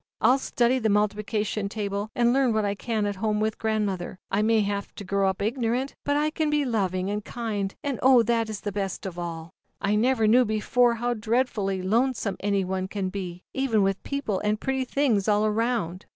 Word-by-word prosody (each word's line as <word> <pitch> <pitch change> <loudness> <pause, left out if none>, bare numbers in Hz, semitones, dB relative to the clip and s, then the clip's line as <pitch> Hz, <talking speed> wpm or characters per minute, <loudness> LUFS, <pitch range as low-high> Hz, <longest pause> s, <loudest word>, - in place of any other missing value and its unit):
I'll 260 +2 +4
study 250 0 +1
the 220 -2 +1
multiplication 210 0 0
table, 205 0 -3
and 240 0 +3
learn 265 -3 +3
w - - 0
r 215 - +2
hat 205 - +1
I - - 0
can 215 0 -2
at 205 -1 -2
home 210 +1 0
with 215 0 -1
grandmother. 205 -5 -1
I 200 +2 +2
may 225 +1 +3
O - - +4
J - - 0
have 200 0 -3
to - - -7
grow 195 0 +1
up 190 +1 -3
ignorant, 245 +3 -1
but 285 0 +2
I 305 +1 +1
can 315 -1 0
be 295 -1 +1
loving 190 -5 -1
and 210 0 -3
kind, 210 -5 -3
and 280 -4 -2
oh, 255 -2 +6
that 230 0 +1
is 210 -2 -5
best 200 -2 -3
of 175 -2 -5
all! 165 -1 -5 0.3
I 205 0 0
never 225 +1 +2
knew 240 +4 +6
before 235 +2 +2
how 240 +1 -1
dreadfully 220 -4 0
i - - -8
i - - -5
l 190 - -2
onesome 250 -7 -2
any 200 -1 0
one 185 0 -2
can 195 -1 -3
be, 185 -2 -6
even 250 -6 +2
with 195 0 0
j - - -12
j - - -3
Deople 200 -4 -1
and 210 0 +1
pretty 265 -1 -1
things 245 -8 +1
all 210 0 +3
around. 215 -5 -1
215 Hz, 235 wpm, -26 LUFS, 200-240 Hz, 0.3 s, oh